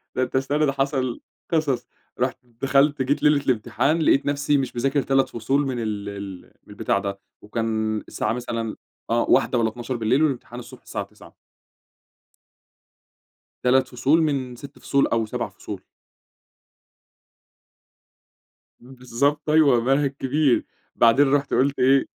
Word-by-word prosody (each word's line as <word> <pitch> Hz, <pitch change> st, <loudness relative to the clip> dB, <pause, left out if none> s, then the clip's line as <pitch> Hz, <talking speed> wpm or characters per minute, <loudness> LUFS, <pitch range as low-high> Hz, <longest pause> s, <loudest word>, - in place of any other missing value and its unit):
ده 130 Hz, -, +1 dB
أنت 130 Hz, -, -4 dB
استنى 145 Hz, +3 st, +1 dB
ده 140 Hz, -, +1 dB
حصل 135 Hz, -3 st, -1 dB, 0.3 s
قصص، 155 Hz, -7 st, 0 dB, 0.3 s
رُحت 125 Hz, 0 st, 0 dB
دخلت 135 Hz, +4 st, +1 dB
جيت 135 Hz, +3 st, 0 dB
ليلة 150 Hz, -1 st, +4 dB
الامتحان 125 Hz, +6 st, +1 dB
لقيت 140 Hz, -2 st, +3 dB
نَفسي 145 Hz, 0 st, +1 dB
مش 135 Hz, -3 st, -3 dB
مذاكر 135 Hz, +4 st, +1 dB
3 135 Hz, 0 st, +1 dB
فصول 135 Hz, +5 st, 0 dB
من 125 Hz, -2 st, -3 dB
ال 105 Hz, -3 st, -3 dB
ال 100 Hz, -2 st, -7 dB, 0.2 s
من -, -, -24 dB
البتاع 100 Hz, -, 0 dB
ده، 100 Hz, 0 st, -4 dB, 0.2 s
وكان 110 Hz, 0 st, -2 dB
الساعة -, -, -2 dB
مثلًا 115 Hz, -2 st, -4 dB, 0.3 s
آه 115 Hz, +1 st, +2 dB
01:00 125 Hz, -, +3 dB
والّا 115 Hz, -1 st, +2 dB
00:00 120 Hz, +3 st, 0 dB
والامتحان 125 Hz, -4 st, -2 dB
الصبح 120 Hz, 0 st, -12 dB
الساعة -, -, -5 dB
09:00. -, -, -17 dB, 2.3 s
3 130 Hz, +1 st, +3 dB
فصول 135 Hz, +6 st, +2 dB
من 135 Hz, -5 st, -1 dB
6 140 Hz, +3 st, -12 dB
فصول 140 Hz, 0 st, +1 dB
أو 115 Hz, -1 st, 0 dB
7 110 Hz, -, -4 dB
فصول. -, -, -8 dB, 3.0 s
بالضبط 130 Hz, +4 st, -2 dB
أيوه، 145 Hz, -6 st, +5 dB
منهج 135 Hz, +3 st, +2 dB
كبير، 140 Hz, 0 st, +2 dB, 0.3 s
بعدين 135 Hz, +4 st, +4 dB
رُحت 145 Hz, -1 st, +1 dB
قلت 140 Hz, +2 st, +2 dB
إيه، 135 Hz, +1 st, +4 dB
130 Hz, 135 wpm, -23 LUFS, 115-140 Hz, 3.0 s, أيوه